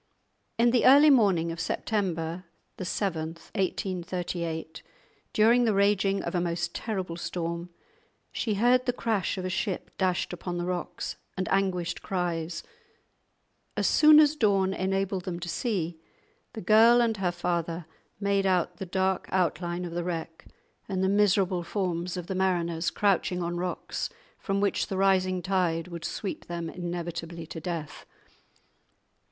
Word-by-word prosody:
In 235 Hz, +1 st, +4 dB
the 245 Hz, 0 st, +4 dB
early 290 Hz, +3 st, +8 dB
morning 190 Hz, -10 st, +3 dB
of 165 Hz, -, -6 dB
September 175 Hz, -3 st, -2 dB, 0.4 s
7, 170 Hz, -4 st, -2 dB, 0.2 s
1838, 175 Hz, -4 st, -3 dB, 0.5 s
during 230 Hz, +3 st, +5 dB
the 220 Hz, -3 st, +2 dB
raging 200 Hz, 0 st, +2 dB
of -, -, -4 dB
a 175 Hz, -, +1 dB
most 170 Hz, 0 st, -2 dB
terrible 190 Hz, -6 st, -3 dB
storm, 170 Hz, 0 st, -4 dB, 0.6 s
she 220 Hz, -4 st, -1 dB
heard 245 Hz, +4 st, +3 dB
the 245 Hz, -, +2 dB
crash 220 Hz, -6 st, -1 dB
of 185 Hz, -, -3 dB
a -, -, -1 dB
ship 190 Hz, 0 st, -2 dB
dashed 185 Hz, -2 st, 0 dB
upon 175 Hz, 0 st, -4 dB
the 175 Hz, -, -2 dB
rocks, 180 Hz, -1 st, -4 dB, 0.2 s
and 185 Hz, -2 st, -1 dB
anguished 185 Hz, -3 st, 0 dB
cries; 175 Hz, -3 st, -2 dB, 1.1 s
as -, -, +1 dB
soon 305 Hz, 0 st, +7 dB
as 305 Hz, 0 st, +5 dB
dawn 195 Hz, -7 st, +2 dB
enabled 195 Hz, 0 st, -1 dB
them 175 Hz, -2 st, -3 dB
to 175 Hz, -, -6 dB
see, 175 Hz, -6 st, -2 dB, 0.5 s
the 220 Hz, -, -6 dB
girl 225 Hz, +5 st, +6 dB
and 230 Hz, -2 st, +2 dB
her 185 Hz, -3 st, 0 dB
father 170 Hz, -1 st, -2 dB, 0.3 s
made 200 Hz, -1 st, +1 dB
out 180 Hz, -2 st, +1 dB
the 190 Hz, -, -6 dB
dark 190 Hz, +1 st, 0 dB
outline 175 Hz, 0 st, 0 dB
of 175 Hz, -, -6 dB
the 175 Hz, 0 st, -2 dB
wreck, 165 Hz, -2 st, -5 dB, 0.4 s
and 190 Hz, -1 st, -1 dB
the 190 Hz, -, +3 dB
miserable 195 Hz, -2 st, +3 dB
forms 180 Hz, -1 st, -2 dB
of 180 Hz, -, -4 dB
the 190 Hz, -, -4 dB
mariners 175 Hz, -3 st, 0 dB
crouching 185 Hz, -3 st, +1 dB
on 170 Hz, +1 st, -2 dB
rocks 180 Hz, +1 st, -3 dB, 0.3 s
from 195 Hz, -1 st, -1 dB
which 200 Hz, 0 st, +1 dB
the 190 Hz, -, -3 dB
rising 185 Hz, -2 st, +2 dB
tide 180 Hz, -3 st, 0 dB
would 170 Hz, -2 st, -7 dB
sweep 200 Hz, -, -4 dB
them 170 Hz, -1 st, -4 dB
inevitably 170 Hz, -1 st, -5 dB
to 160 Hz, -, -7 dB
death. 165 Hz, -3 st, -5 dB
185 Hz, 145 wpm, -28 LUFS, 170-200 Hz, 1.1 s, early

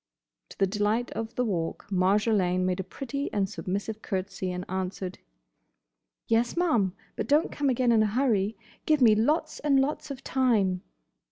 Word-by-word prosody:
To -, -, -13 dB
the 195 Hz, -, +3 dB
delight 210 Hz, +4 st, 0 dB
of 225 Hz, +1 st, -5 dB
the 250 Hz, -, +1 dB
Walk 170 Hz, -7 st, -2 dB
Marjolaine 185 Hz, -1 st, +2 dB
made 185 Hz, 0 st, 0 dB
a -, -, -1 dB
pretty 275 Hz, +8 st, -5 dB
and 200 Hz, -2 st, +1 dB
submissive 205 Hz, +2 st, -4 dB
curtsey, 190 Hz, -1 st, -3 dB
and 180 Hz, 0 st, -4 dB
answered, 185 Hz, 0 st, -4 dB, 1.1 s
"Yes, 235 Hz, +6 st, +1 dB
ma'am; 230 Hz, -, +2 dB, 0.2 s
but -, -, -3 dB
don't 295 Hz, +3 st, +3 dB
come 285 Hz, -1 st, 0 dB
again 250 Hz, -1 st, +2 dB
in 225 Hz, -2 st, +5 dB
a 215 Hz, -, +3 dB
hurry. 215 Hz, -3 st, +1 dB, 0.3 s
Give 305 Hz, -1 st, +4 dB
me 235 Hz, -4 st, +7 dB
lots 305 Hz, +8 st, +1 dB
and 280 Hz, -2 st, +3 dB
lots 300 Hz, +3 st, -1 dB
of 275 Hz, -1 st, -7 dB
time!" 215 Hz, -10 st, +2 dB
215 Hz, 165 wpm, -27 LUFS, 190-260 Hz, 1.1 s, me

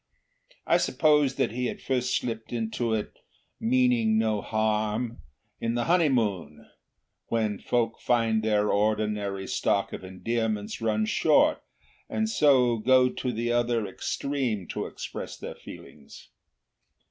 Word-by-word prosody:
I -, -, +4 dB
suppose 150 Hz, -3 st, +2 dB
that -, -, 0 dB
he 125 Hz, +2 st, -2 dB
had -, -, -5 dB
first 125 Hz, -1 st, 0 dB
slipped 115 Hz, -2 st, -5 dB
into 115 Hz, 0 st, -2 dB
it, 105 Hz, -, -5 dB, 0.4 s
meaning 120 Hz, -2 st, +2 dB
no 110 Hz, -2 st, +1 dB
harm, 110 Hz, +2 st, -1 dB, 0.4 s
in 115 Hz, 0 st, -1 dB
the 120 Hz, -, 0 dB
honeymoon, 115 Hz, -, +1 dB, 0.6 s
when 110 Hz, -3 st, -1 dB
folk 115 Hz, -2 st, -1 dB
find 115 Hz, -2 st, +1 dB
their 105 Hz, -1 st, +1 dB
ordinary 105 Hz, -2 st, 0 dB
stock -, -, 0 dB
of -, -, -7 dB
endearments 105 Hz, +3 st, -3 dB
run 110 Hz, -1 st, +1 dB
short, -, -, +3 dB, 0.5 s
and 220 Hz, 0 st, 0 dB
so 130 Hz, -, +4 dB
go 125 Hz, +3 st, +4 dB
to 125 Hz, 0 st, -3 dB
the 120 Hz, +1 st, -2 dB
other 120 Hz, -2 st, +1 dB
extreme 115 Hz, +1 st, -2 dB
to -, -, -3 dB
express -, -, -7 dB
their -, -, -7 dB
feelings. 70 Hz, -2 st, -13 dB
115 Hz, 125 wpm, -27 LUFS, 105-125 Hz, 0.6 s, I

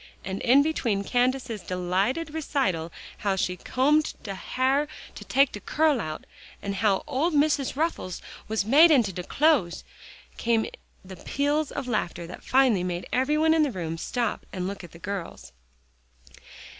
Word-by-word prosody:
And 190 Hz, 0 st, -4 dB
in 270 Hz, +4 st, +5 dB
between 235 Hz, -10 st, 0 dB
Candace's 245 Hz, -1 st, 0 dB
delighted 190 Hz, -, -1 dB
recital 195 Hz, -, -1 dB, 0.3 s
how 200 Hz, -2 st, 0 dB
she 180 Hz, -1 st, -1 dB
combed 295 Hz, +9 st, +1 dB
"de 200 Hz, -, -4 dB
ha'r 260 Hz, +8 st, 0 dB, 0.3 s
to -, -, -9 dB
take 275 Hz, +1 st, +3 dB
de 210 Hz, -, -7 dB
curl 300 Hz, +3 st, +1 dB
out," 155 Hz, 0 st, -6 dB, 0.3 s
and 200 Hz, -, -4 dB
how 200 Hz, -2 st, +2 dB
"ole 300 Hz, +3 st, 0 dB
Missus' 290 Hz, -4 st, +1 dB
ruffles 305 Hz, -, -2 dB, 0.3 s
was 220 Hz, -2 st, -1 dB
made 295 Hz, +9 st, +7 dB
into 240 Hz, -11 st, +3 dB
de 180 Hz, -, -4 dB
clothes," 250 Hz, -, +2 dB, 0.5 s
came 230 Hz, -1 st, +1 dB, 0.4 s
the 185 Hz, 0 st, -10 dB
peals 290 Hz, -, -1 dB
of 270 Hz, -3 st, -5 dB
laughter 175 Hz, -7 st, -2 dB
that 175 Hz, -, -10 dB
finally 255 Hz, -8 st, +3 dB
made 180 Hz, -1 st, -3 dB
every 265 Hz, +4 st, +2 dB
one 320 Hz, +1 st, +4 dB
in 320 Hz, -, +3 dB
the 295 Hz, -3 st, +2 dB
room 165 Hz, -5 st, -4 dB
stop 235 Hz, +7 st, -2 dB
and 185 Hz, -2 st, -4 dB
look 195 Hz, -1 st, -6 dB
at 175 Hz, -, -11 dB
the -, -, -13 dB
girls. 170 Hz, -, -6 dB
235 Hz, 160 wpm, -26 LUFS, 185-285 Hz, 0.5 s, made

